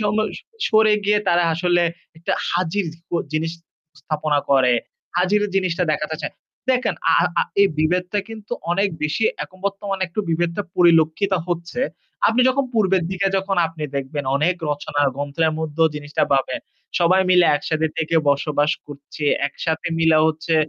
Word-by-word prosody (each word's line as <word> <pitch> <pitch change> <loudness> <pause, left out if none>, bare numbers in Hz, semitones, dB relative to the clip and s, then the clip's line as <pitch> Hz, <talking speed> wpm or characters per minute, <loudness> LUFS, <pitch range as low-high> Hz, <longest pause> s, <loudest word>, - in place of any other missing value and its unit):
সম 210 -1 0 0.5
সরে 215 -1 +5
গিয়ে 210 +1 +3
তারা 175 0 +3
আসলে 175 +1 +2 0.4
একটা 170 - -2 0.2
হাজির 180 +2 0 0.3
অ - - +3 0.2
জিনিস 160 +1 -1 0.5
স্থাপনা 150 0 0
করে, 130 -3 +5 0.4
হাজির 190 +4 +2
জিনিসটা 185 -2 +1
দেখাতে 155 +1 -2
চায়। - - -4 0.4
দেখেন, 255 -1 +1 0.2
আ - - +5 0.3
আ - - +3 0.2
এই 200 - +7
বিভেদটা 180 +5 +1
কিন্তু 220 0 -9 0.2
অনেক 195 +3 +2
বেশি 150 +9 0 0.2
এখন 185 - -18
বর্তমানে 195 -1 -3
একটু 175 +5 -2
বিভেদটা 170 +4 0
পরিলক্ষিত 170 +2 +4 0.2
হচ্ছে। 175 +7 -3 0.5
আপনি 225 +3 +3
যখন 275 +2 +1
পূর্বের 195 -5 +2
দিকে 190 +1 0
যখন 195 0 -1
আপনি 160 -1 -9
দেখবেন 140 +1 -3
অনেক 160 +6 +2 0.2
রচনা 145 0 -2
ও - - -3
গ্রন্থের 150 +3 0
মধ্যেও 160 0 +1
জিনিসটা 145 0 -2
পাবেন। 135 -1 +1 0.4
সবাই 185 +2 +4
মিলে 180 -1 +6
একসাথে 155 +1 -1
থেকে 165 0 0
বসবাস 145 +1 +1 0.2
করছে, 145 +1 -7 0.2
একসাথে 160 -1 -3
মিলে 160 -1 +4
হচ্ছে। 160 +1 -1
170 Hz, 150 wpm, -21 LUFS, 155-195 Hz, 0.5 s, এই